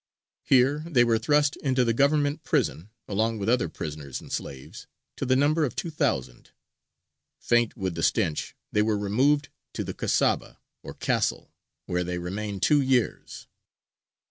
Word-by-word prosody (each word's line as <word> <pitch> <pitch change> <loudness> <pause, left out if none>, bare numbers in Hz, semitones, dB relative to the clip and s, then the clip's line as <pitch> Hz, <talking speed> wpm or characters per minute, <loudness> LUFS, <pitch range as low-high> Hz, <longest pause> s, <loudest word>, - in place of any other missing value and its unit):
Here 135 +3 +3
they 130 -8 +4
were 115 -2 +2
thrust 145 +1 +2
into 130 -3 +1
the 115 - +2
Government 145 +4 +2
prison, 90 - -1 0.2
along 110 +3 0
with 100 -1 -4
other 120 -7 +2
prisoners 75 -4 -6
and - - -13
slaves, 65 -1 -6 0.3
to - - -3
the 130 - +3
number 150 +4 +3
of 130 -6 -2
two 170 - -4
thousand. 65 - -2 0.9
Faint 120 0 +1
with 95 -4 -2
the 80 - -4
stench, 85 -5 0 0.2
they 105 - +2
were 105 0 +1
removed 130 +9 +1 0.2
to - - -3
the - - -5
Kasaba - - 0 0.2
or - - -9
Castle, - - -1 0.3
where 90 0 -1
they 90 0 -3
remained 100 +2 -4
two 150 -1 +4
years. 130 -3 -1
115 Hz, 155 wpm, -26 LUFS, 95-140 Hz, 0.9 s, they